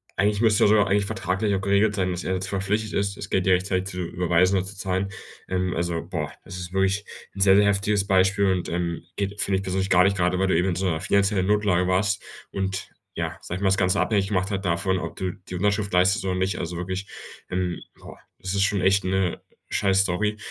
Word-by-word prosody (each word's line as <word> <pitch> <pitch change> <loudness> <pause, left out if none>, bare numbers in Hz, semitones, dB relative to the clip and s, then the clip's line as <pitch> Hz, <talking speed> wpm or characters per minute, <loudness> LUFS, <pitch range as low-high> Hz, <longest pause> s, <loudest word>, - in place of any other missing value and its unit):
eigentlich 105 +2 +1
müsste 110 -3 +4
doch - - +5
sogar 105 -1 +4
eigentlich 100 +1 +2
vertraglich 100 0 -1
auch 95 - -2
geregelt 100 +2 +2
sein, 95 -2 0
dass 90 0 -4
er 95 - -1
jetzt 95 +1 -2
verpflichtet 105 +2 -1
ist 100 0 -1
das 100 - -7
Geld 95 -1 +1
dir 95 - +4
rechtzeitig 95 0 0
zu 90 -1 -6
überweisen 90 +2 +1
oder 95 - -1
zu 95 0 -9
zahlen. 95 0 -1 0.4
Ähm, 90 -1 -1
also, 85 0 -2
boah, - - -3
das 90 - -9
ist 90 0 -7
wirklich 95 +1 +1 0.3
'n 100 - -5
sehr, 95 0 +6
sehr 100 +1 +5
heftiges 100 0 +1
Beispiel 95 +1 +3
und, 90 -1 -2
ähm, 85 -1 -2
geht, 100 0 -3
finde 95 -1 +1
ich 95 - -4
persönlich 95 +1 -1
gar 90 -1 +6
nicht, 100 +1 +2
grade 90 0 +1
weil 95 - +2
du 95 - +2
eben 90 +2 +2
in 90 - -1
so 95 +3 -2
'ner 80 -3 0
finanziellen 100 -1 +2
Notlage 100 -4 +2
warst 100 +2 +1 0.3
und 95 -1 -3 0.3
ja, - - -3
sage 90 - -5
ich - - -8
mal, - - +3
das 95 - +2
Ganze 90 -1 +2
abhängig 100 -3 +1
gemacht 95 0 -1
hat 95 0 -3
davon, 95 +2 0
ob - - -6
du 95 -1 -2
die 90 +1 -10
Unterschrift 100 +2 0
leistet 95 +5 +3
oder 95 -1 0
nicht. 95 0 -1
Also, 85 0 -4
wirklich, 95 +2 -4 0.4
ähm, 90 -1 -2 0.2
boah, - - -12 0.2
es 95 0 -4
ist 100 - +1
schon 100 -1 +1
echt 95 +1 +3
'ne 95 -1 -1 0.3
scheiß-Story. 95 +1 +1
95 Hz, 235 wpm, -24 LUFS, 90-100 Hz, 0.4 s, sehr